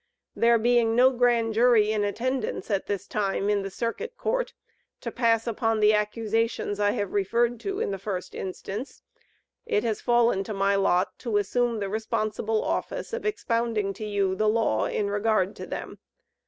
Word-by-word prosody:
There 235 Hz, 0 st, +4 dB
being 230 Hz, 0 st, +3 dB
no 255 Hz, +2 st, +6 dB
Grand 240 Hz, -3 st, +2 dB
Jury 225 Hz, -2 st, +4 dB
in 215 Hz, -1 st, 0 dB
attendance 235 Hz, +3 st, -2 dB
at 195 Hz, -1 st, 0 dB
this 200 Hz, -1 st, -3 dB
time 200 Hz, -1 st, -1 dB
in 205 Hz, -1 st, +1 dB
the 195 Hz, -, -4 dB
Circuit 240 Hz, -, -4 dB
Court, -, -, -1 dB, 0.5 s
to -, -, -4 dB
pass 230 Hz, -2 st, +2 dB
upon 225 Hz, -1 st, 0 dB
the 210 Hz, 0 st, +5 dB
accusations 215 Hz, 0 st, -1 dB
I 205 Hz, 0 st, +3 dB
have 205 Hz, -2 st, -3 dB
referred 230 Hz, +4 st, +1 dB
to 390 Hz, -, -3 dB
in -, -, -1 dB
the 195 Hz, -, -4 dB
first 185 Hz, -2 st, -5 dB
instance, 195 Hz, +6 st, -6 dB, 0.6 s
it 210 Hz, -, +1 dB
has 225 Hz, -3 st, -1 dB
fallen 240 Hz, -5 st, +3 dB
to 215 Hz, -, -5 dB
my 195 Hz, +1 st, +2 dB
lot 185 Hz, -2 st, +1 dB
to 230 Hz, -4 st, -1 dB
assume 235 Hz, +3 st, 0 dB
the 200 Hz, -2 st, -2 dB
responsible 215 Hz, +1 st, -1 dB
office -, -, -3 dB
of 465 Hz, -2 st, -2 dB
expounding 230 Hz, -, -1 dB
to 205 Hz, -, -8 dB
you 200 Hz, -2 st, 0 dB
the 215 Hz, +3 st, +1 dB
law 215 Hz, -, +1 dB
in 205 Hz, -, -1 dB
regard 205 Hz, -1 st, +1 dB
to -, -, -7 dB
them. -, -, -6 dB
220 Hz, 175 wpm, -26 LUFS, 205-235 Hz, 0.6 s, no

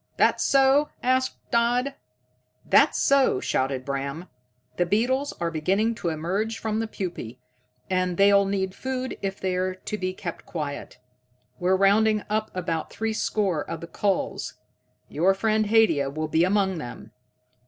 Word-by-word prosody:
"That -, -, +3 dB
so?" 275 Hz, +2 st, +4 dB
asked 260 Hz, +1 st, +1 dB
Dodd. 245 Hz, +3 st, +2 dB, 0.7 s
"That's -, -, +4 dB
so," 275 Hz, -, +3 dB
shouted 130 Hz, 0 st, -1 dB
Bram. 140 Hz, +5 st, -4 dB, 0.5 s
"The 175 Hz, -, +2 dB
beetles 255 Hz, +8 st, +1 dB
are 170 Hz, -1 st, -1 dB
beginning 195 Hz, +8 st, +1 dB
to 170 Hz, -, 0 dB
emerge 190 Hz, +8 st, -2 dB
from 220 Hz, -1 st, -2 dB
the 225 Hz, -, -2 dB
pupae, 175 Hz, -, -6 dB, 0.5 s
and 185 Hz, -2 st, 0 dB
they'll 200 Hz, 0 st, +5 dB
need 190 Hz, -1 st, -1 dB
food 260 Hz, +1 st, -4 dB
if 195 Hz, 0 st, -3 dB
they're 185 Hz, 0 st, -1 dB
to 210 Hz, +3 st, -5 dB
be 185 Hz, 0 st, -2 dB
kept 170 Hz, -3 st, -6 dB
quiet. 145 Hz, -6 st, -5 dB, 0.6 s
We're 185 Hz, +1 st, +2 dB
rounding 210 Hz, +2 st, +3 dB
up 215 Hz, 0 st, 0 dB
about 165 Hz, -3 st, -2 dB
threescore 215 Hz, -6 st, -1 dB
of 165 Hz, -, -4 dB
the -, -, -7 dB
culls 195 Hz, +3 st, -2 dB, 0.5 s
your 185 Hz, +6 st, +2 dB
friend 215 Hz, +1 st, +1 dB
Haidia 205 Hz, -11 st, +3 dB
will 155 Hz, +3 st, -3 dB
be 160 Hz, +2 st, +3 dB
among 190 Hz, -2 st, +1 dB
them. 120 Hz, -6 st, -9 dB
195 Hz, 145 wpm, -25 LUFS, 170-220 Hz, 0.7 s, they'll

